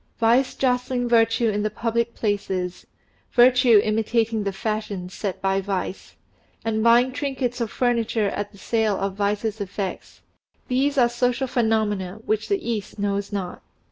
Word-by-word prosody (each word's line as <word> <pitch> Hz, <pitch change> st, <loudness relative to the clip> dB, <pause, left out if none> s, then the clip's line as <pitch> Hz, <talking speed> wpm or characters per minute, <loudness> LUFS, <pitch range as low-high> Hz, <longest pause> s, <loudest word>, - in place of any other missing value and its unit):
Vice 240 Hz, +3 st, +3 dB
jostling 250 Hz, -1 st, 0 dB
virtue 230 Hz, 0 st, +3 dB
in 210 Hz, 0 st, -1 dB
the 215 Hz, -, 0 dB
public 230 Hz, +2 st, -1 dB
places; 190 Hz, -4 st, -2 dB, 0.5 s
virtue 250 Hz, -2 st, +6 dB
imitating 220 Hz, 0 st, 0 dB
the 200 Hz, -, -1 dB
fashions 205 Hz, -3 st, -4 dB
set 195 Hz, -3 st, -4 dB
by 195 Hz, 0 st, +1 dB
vice, 190 Hz, -1 st, -4 dB, 0.5 s
and 220 Hz, -1 st, 0 dB
buying 240 Hz, +2 st, +5 dB
trinkets 260 Hz, -3 st, -3 dB
or 230 Hz, -, 0 dB
furniture 230 Hz, -3 st, 0 dB
at 205 Hz, +1 st, -4 dB
the 200 Hz, -, -17 dB
sale 220 Hz, -1 st, 0 dB
of 195 Hz, 0 st, -2 dB
vice's 205 Hz, +2 st, -1 dB
effects 195 Hz, -1 st, -5 dB, 0.5 s
these 275 Hz, +3 st, +1 dB
are 245 Hz, -2 st, +6 dB
social 245 Hz, +2 st, 0 dB
phenomena 215 Hz, -6 st, 0 dB
which 215 Hz, -, -1 dB
the 395 Hz, -7 st, -1 dB
East 215 Hz, -3 st, -3 dB
knows 200 Hz, 0 st, -2 dB
not. 190 Hz, -3 st, -4 dB
220 Hz, 145 wpm, -23 LUFS, 200-240 Hz, 0.5 s, virtue